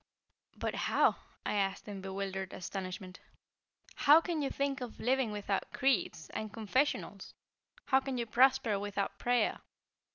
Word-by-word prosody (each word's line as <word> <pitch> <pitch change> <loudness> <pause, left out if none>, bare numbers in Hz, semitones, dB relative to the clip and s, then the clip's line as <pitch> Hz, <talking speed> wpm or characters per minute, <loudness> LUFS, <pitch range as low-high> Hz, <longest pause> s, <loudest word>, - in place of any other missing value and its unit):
"But - - -2 0.2
how," - - +4 0.3
I - - 0
asked 195 -1 -1
in 200 -2 -6
bewildered 190 0 -4
astonishment, 185 0 -6 0.8
"how 295 +3 +7
can 330 -2 -2
you 275 - 0
think 275 -1 -1
of 245 -2 -7
living 255 -1 +1
without 205 -1 -2
creeds, 260 - 0
and 215 -1 -4
confessionals? 230 +7 -1 0.5
How 265 - +4
can 265 -1 -4
you 235 - -1
prosper 240 -2 +3
without 200 -1 -3
prayer? 245 0 +1
220 Hz, 135 wpm, -33 LUFS, 195-265 Hz, 0.8 s, how